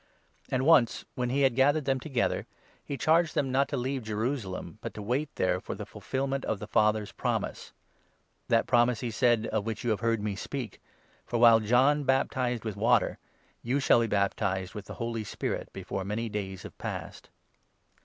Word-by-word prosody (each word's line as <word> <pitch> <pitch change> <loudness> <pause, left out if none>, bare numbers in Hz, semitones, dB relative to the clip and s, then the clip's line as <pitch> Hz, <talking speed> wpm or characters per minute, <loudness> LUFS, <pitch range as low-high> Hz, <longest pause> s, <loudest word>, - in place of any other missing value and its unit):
And 130 - 0
4 - - 0
once, 145 -8 +4
when 125 -1 -2
he 140 +3 +1
had 130 -3 +3
gathered 145 +3 +3
them 135 -1 +1
together, 130 -3 -1 0.4
he 140 - -5
charged 165 +2 +3
them 135 -3 +1
not 135 +2 +2
to - - -2
leave 130 +2 -2
Jerusalem, 110 -4 -3
but - - -6
to 105 - -6
wait 130 +8 -1
there 90 0 +1
for - - -6
the - - -6
fulfilment 135 0 -3
of 110 - -1
the 105 - -7
Father's 105 0 +2
promise - - -3 0.4
— - - -42
"that - - +3
promise," 120 -1 +3
he 120 - -2
said, 120 -1 +2
"of 110 -1 -1
which 110 -1 -3
you 120 - +1
have 105 - 0
heard 115 0 +1
me 105 -2 -2
speak; 125 +3 -6 0.5
for, 120 - -1
while 115 -1 +7
John 130 +7 +3
baptized 130 -3 0
with 110 - -2
5 100 - -11
water, 120 0 +3 0.4
you 130 +4 0
shall 135 - +5
be 115 - +1
baptized 95 -2 0
with 105 -1 -7
the - - -8
Holy 115 -2 -3
Spirit 100 - -4
before 95 0 -5
many 110 +4 -3
days 95 -3 -5
have - - -10
passed." - - -6
120 Hz, 195 wpm, -29 LUFS, 105-135 Hz, 0.5 s, while